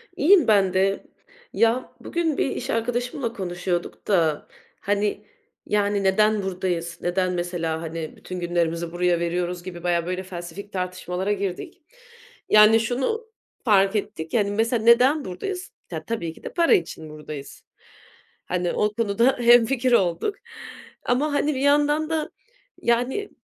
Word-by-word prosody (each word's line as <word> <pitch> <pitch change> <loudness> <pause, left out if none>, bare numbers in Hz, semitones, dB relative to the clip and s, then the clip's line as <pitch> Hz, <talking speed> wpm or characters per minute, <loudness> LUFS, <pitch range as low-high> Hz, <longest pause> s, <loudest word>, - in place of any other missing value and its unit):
İyiyim 350 0 +5
ben 195 -4 +4
de. 195 +1 +1 0.5
Ya, 230 +3 +1
bugün 330 -4 -1
bir - - +1
iş - - -5
arkadaşımla 240 +1 -2
konuşuyorduk 175 -3 -4
da, 165 -7 +1 0.3
hani, 205 +1 -1 0.4
yani, 205 -1 +1
"Neden 210 +2 +3
buradayız, 180 -3 -3
neden 180 +1 0
mesela, 175 -2 -2
hani, 165 -1 -6
bütün 185 0 -7
günlerimizi 170 -1 -1
buraya 175 0 +1
veriyoruz?" 175 +1 -2
gibi 175 -2 -8
bayağı, 170 -1 +1
böyle, 185 +1 -3
felsefik 185 +2 -8
tartışmalara 185 +1 -3
girdik. 200 - -5 0.7
Yani, 215 +1 +7
şunu 260 - -2 0.4
fark 195 -2 +4
ettik, 200 -6 -4
yani, 205 -3 +2
mesela 225 +2 0
neden 255 +6 +5
buradayız? 360 - -5 0.2
Ta - - -6
tabii 170 -8 -3
ki - - -18
de - - -7
para 340 -1 +4
için 160 -2 -1
buradayız. 150 -2 -9 0.8
Hani, 180 -1 -1
o 210 0 0
konuda 230 +3 +2
hemfikir 240 +1 +4
olduk. 190 - +1 0.7
Ama, 285 +5 +1
hani, 290 0 +1
bir - - -2
yandan 295 +2 +3
da, 315 -2 -1 0.5
yani, 245 - 0
200 Hz, 135 wpm, -24 LUFS, 175-240 Hz, 0.8 s, Yani